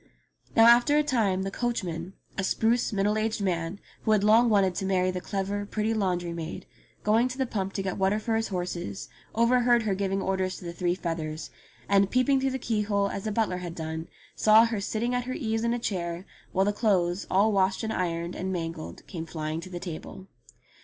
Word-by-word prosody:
Now 225 - +7
after 240 +5 +6
a 300 - +4
time 210 -9 +1
the 195 - -3
coachman, 185 -7 -3 0.2
a 195 - -2
spruce 230 +5 +1
middle 210 +1 +1
aged 220 +1 -1
man, 175 -1 -1 0.2
who 220 - +2
had 205 -2 +3
long 225 +3 +5
wanted 195 -4 +3
to 190 +2 -3
marry 185 -1 +2
the 180 0 -4
clever, 200 +1 -2
pretty 215 +2 -1
laundry 180 -5 -1
maid, 165 0 -6 0.4
going 225 +4 +3
to 255 0 -6
the 265 - +1
pump 195 -5 -3
to 195 - -2
get 190 +1 -3
water 195 +2 +2
for 220 +1 -1
his 225 0 0
horses 175 - -4 0.3
over 235 +2 +4
heard 240 -1 +4
her 210 -3 0
giving 195 0 -1
orders 190 -1 -1
to 180 - -11
the 170 - -5
three 175 0 0
feathers, 165 -3 -4 0.4
and 200 -1 +4
peeping 265 +3 +3
through 270 - +1
the 265 - -2
keyhole 210 -4 0
as 195 - -5
the 215 - -1
butler 210 -4 0
had 175 -2 -6
done, 160 0 -5 0.3
saw 220 +1 +6
her 225 -3 -2
sitting 230 +4 -1
at 245 0 -1
her 255 - -3
ease 225 -1 -1
in 235 - +1
a 240 - +1
chair 175 -5 -3 0.3
while 190 0 +2
the 205 - +1
clothes, 190 -4 +1
all 200 +4 +4
washed, 190 0 +1
and 220 - -1
ironed, 170 -1 -2
and 190 +1 -3
mangled 165 -3 -5
came 165 -4 -6
flying 155 0 -4
to 185 - -9
the 175 -1 -5
table. 180 +2 -7
195 Hz, 215 wpm, -27 LUFS, 180-225 Hz, 0.4 s, Now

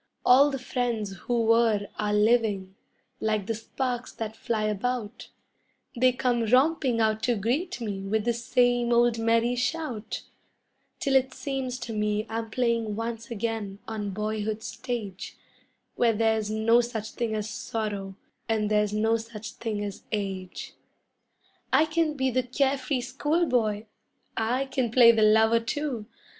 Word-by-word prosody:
All 270 +4 +7
the 275 - -3
friends 240 -5 -2
who 235 +4 -1
were 225 -2 +3
are 210 0 0
living 210 -3 +2 0.5
like 215 -2 0
the 225 - -1
sparks 245 +2 -3
that 220 -1 -5
fly 225 -1 -2
about; 215 +2 -2 0.7
They 255 +1 +4
come 245 -1 0
romping 260 0 +3
out 220 -1 +2
to 240 0 +1
greet 265 - -1
me 205 -4 -4
with 215 +1 0
the 240 - +2
same 245 0 +2
old 235 -1 +3
merry 230 +1 +2
shout, 250 -3 -3 0.8
Till 275 - 0
it 260 -1 +2
seems 260 -1 -3
to 230 - -5
me 210 0 0
I'm 225 0 -3
playing 230 -3 0
once 230 +1 -4
again 225 -3 -3
on 215 -2 -3
boyhood's 215 +2 -3
stage, 235 -5 -5 0.6
Where 235 -1 +3
there's 220 -1 +1
no 220 +2 +4
such 220 -3 -5
thing 230 -2 -2
as 210 0 -2
sorrow 210 -3 -4 0.3
and 215 -1 +1
there's 210 -1 +2
no 220 +2 +2
such 225 -1 -8
thing 215 -3 -4
as 200 -1 -6
age. 195 -3 -4 1.0
I 310 - +5
can 315 -1 0
be 265 -2 0
the 255 +1 +2
care 270 +2 0
free 260 -1 -1
schoolboy! 250 -5 0 0.5
I 245 +5 0
can 260 -3 -1
play 235 0 +7
the 225 -1 +1
lover, 220 +2 +5
too! 245 -2 -3
230 Hz, 150 wpm, -27 LUFS, 215-250 Hz, 1.0 s, All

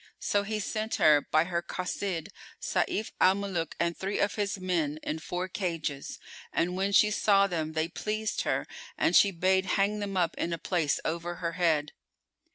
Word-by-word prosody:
So 205 - +1
he 215 +1 -3
sent 215 +2 -2
her, 150 -2 +5
by 155 +2 +2
her 170 0 -2
Cossid,[FN#404] 185 0 -3 0.3
Sayf 215 - -1
al 185 +1 +6
Muluk 190 -5 -3
and 170 0 +1
three 195 +2 -3
of 200 - +1
his 205 -2 -2
men 170 -5 -1
in 155 - -3
four 180 +3 -3
cages; 165 -7 -3 0.3
and, 175 +2 0
when 195 +2 0
she 210 +1 +5
saw 200 -1 +4
them, 160 -4 -2
they 160 0 0
pleased 215 +4 -2
her - - -1 0.3
and - - +2
she 200 - +7
bade 190 +1 +1
hang 205 +2 +1
them 200 -2 -3
up 170 -2 +2
in 170 - -1
a - - -2
place 165 -5 0
over 170 +1 -2
her 170 -1 -3
head. 160 -4 +1
180 Hz, 180 wpm, -29 LUFS, 165-200 Hz, 0.3 s, she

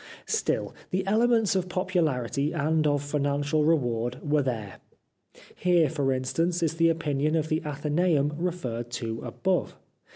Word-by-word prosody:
Still 445 - -1 0.2
the 185 +1 -1
elements 225 0 +3
of 185 -1 0
popularity 155 -7 0
and 155 0 +1
of 145 -1 +1
financial 145 +1 0
reward 120 -6 +1
were 150 0 +3
there. 110 -7 -4 0.7
Here, 175 -5 +2
for 140 -4 0
instance, 165 +7 0
is 160 - +1
the 165 0 +4
opinion 155 -2 0
of 155 -1 0
the 155 +1 +1
Athenceum 150 +1 +1
referred 140 -9 -3
to 115 -1 -3
above. - - -1
150 Hz, 135 wpm, -27 LUFS, 135-170 Hz, 0.7 s, the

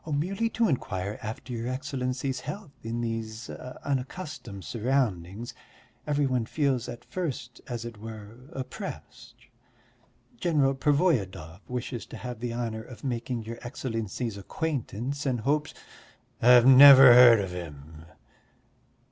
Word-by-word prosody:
"Merely 195 +10 0
to 225 0 +1
inquire 105 - -2
after 110 +4 -6
your 115 0 -4
Excellency's 130 0 -3
health; 200 -7 -7
in 115 +1 -3
these 115 -1 -4
unaccustomed 130 - -5
surroundings 115 -4 -1 0.5
every 145 -1 +1
one 125 -4 0
feels 135 -5 0
at 120 - -9
first, 145 -9 -5
as 120 -2 -5
it 115 -3 -8
were, 110 +4 -10
oppressed.... 170 +9 -8 1.0
General 150 -9 +2
Pervoyedov 130 - 0
wishes 125 -1 -4
to - - -9
have 125 -2 -7
the 120 0 -3
honour 115 -2 -3
of 120 +3 -12
making 120 -2 -3
your 115 +1 -7
Excellency's 115 -3 -4
acquaintance, 140 +1 -3
and 125 -4 0
hopes...." 145 +3 0 0.7
"I've 120 0 +7
never 135 -1 +10
heard 120 -2 +8
of 95 -2 -3
him." 80 -2 -9
125 Hz, 120 wpm, -27 LUFS, 110-140 Hz, 1.0 s, never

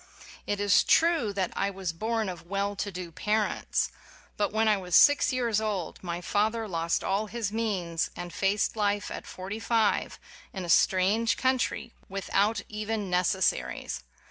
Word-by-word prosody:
It 205 - -1
is 205 -2 +4
true 325 -10 +3
that 190 -2 -1
I 200 - 0
was 190 -3 -4
born 220 +4 -1
of 175 -2 -7
well 200 +2 -1
to 200 +1 -3
do 180 -2 -6
parents. 210 +5 0 0.4
But 205 - 0
when 220 +1 +2
I 215 - +5
was 180 -3 -2
six 290 0 +6
years 235 -4 +1
old 205 -5 -3
my 175 -1 -4
father 220 +4 0
lost 170 -3 -1
all 200 +3 0
his 215 -1 -3
means, 190 -7 -1
and 175 -1 -7
faced 200 +5 +1
life 205 -1 0
at - - -7
forty 195 +4 -6
five, 225 -2 +1 0.4
in 190 -2 -4
a - - -7
strange 195 +7 +3
country, 260 -2 0 0.2
without 200 +2 0
even 215 -2 -3
neces 180 +1 +2
saries. 65 - -1
205 Hz, 165 wpm, -28 LUFS, 185-220 Hz, 0.4 s, six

